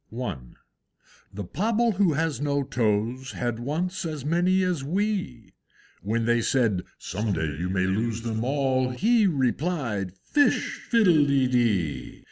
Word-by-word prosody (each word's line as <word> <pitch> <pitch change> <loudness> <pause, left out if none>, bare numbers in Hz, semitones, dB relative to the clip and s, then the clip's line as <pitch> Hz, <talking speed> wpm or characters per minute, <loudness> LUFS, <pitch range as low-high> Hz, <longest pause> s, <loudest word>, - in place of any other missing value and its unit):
I. 125 -3 -3 1.0
The 100 +1 -6
Pobble 225 - +1
who 190 -6 +3
has 155 -1 -1
no 145 -1 0
toes 120 0 -1
Had 120 -2 -3
once 165 +9 -2
as 155 -5 -5
many 180 +4 +2
as 180 -6 -1
we; 175 - -2 0.5
When 115 +3 -1
they 120 0 +2
said, 110 -7 +1 0.2
"Some 105 +3 -3
day 80 -4 -2
you 90 +1 -2
may 95 0 +1
lose 110 +4 -1
them 110 -1 -2
all;" 130 -1 +1
He 215 - +3
replied, 130 - -1
"Fish 290 -1 +1
fiddle 185 -10 +5
de 135 -2 +3
dee!" 110 - 0
130 Hz, 140 wpm, -26 LUFS, 110-170 Hz, 1.0 s, fiddle